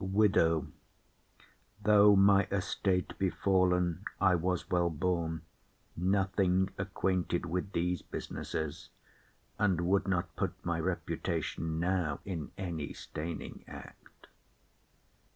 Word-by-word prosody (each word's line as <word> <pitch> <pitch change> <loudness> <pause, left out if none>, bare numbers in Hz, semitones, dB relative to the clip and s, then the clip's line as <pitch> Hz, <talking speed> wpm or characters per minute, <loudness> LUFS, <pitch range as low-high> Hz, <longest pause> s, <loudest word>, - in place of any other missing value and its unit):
WIDOW. 95 -5 +3 1.2
Though 105 0 +7
my 100 +1 +6
estate 95 -1 0
be 95 -1 +2
fall'n, 90 -3 +1 0.2
I 95 -2 +4
was 90 +1 0
well 85 -1 +3
born, 80 0 -1 0.5
Nothing 95 0 +1
acquainted 95 -2 -1
with 90 +4 -3
these 90 0 0
businesses, 80 -2 -5 0.7
And 95 -5 +2
would 95 +3 +2
not 90 -3 -1
put - - -2
my - - 0
reputation 80 -1 -2
now 85 -4 0
In 85 -6 -5
any 85 -7 -4
staining 80 +2 -6
act. - - -13
90 Hz, 100 wpm, -32 LUFS, 85-95 Hz, 1.2 s, Though